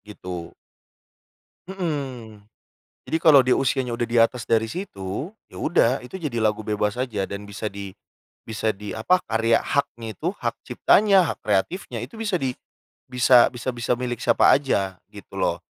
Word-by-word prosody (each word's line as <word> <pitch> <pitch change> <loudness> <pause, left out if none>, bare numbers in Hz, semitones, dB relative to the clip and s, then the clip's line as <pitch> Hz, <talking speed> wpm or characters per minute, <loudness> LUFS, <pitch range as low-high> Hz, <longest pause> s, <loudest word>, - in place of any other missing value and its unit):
Gitu. 90 -5 -8 1.2
Mhm, 135 - -4 0.6
jadi 160 - -1
kalau 155 -4 +7
di 125 - -1
usianya 130 0 +1
udah 120 - 0
di 115 - -6
atas 115 0 0
dari 115 0 +1
situ, 135 - -5 0.2
ya - - -11
udah 130 -6 +2
itu 125 - -13
jadi 150 -10 -3
lagu 110 -1 +1
bebas 105 -1 -1
saja 120 -6 -2
dan 100 0 -6
bisa 100 +2 -5
di 100 -1 -6 0.6
bisa 110 0 -1
di, 105 +1 -8
apa 145 +12 +2
karya 115 +1 +2
haknya 120 -6 -2
itu, 170 - -1
hak - - -3
ciptanya, 195 -4 +4
hak - - -34
kreatifnya 120 - -1
itu 125 - -9
bisa 220 -3 -2
di 135 -4 -1 0.6
bisa 125 -1 +6
bisa 125 +1 -4
bisa 120 0 -1
milik 125 -2 -3
siapa - - +4
aja 100 -9 0
gitu - - -13
loh. - - 0
120 Hz, 160 wpm, -23 LUFS, 105-140 Hz, 1.2 s, kalau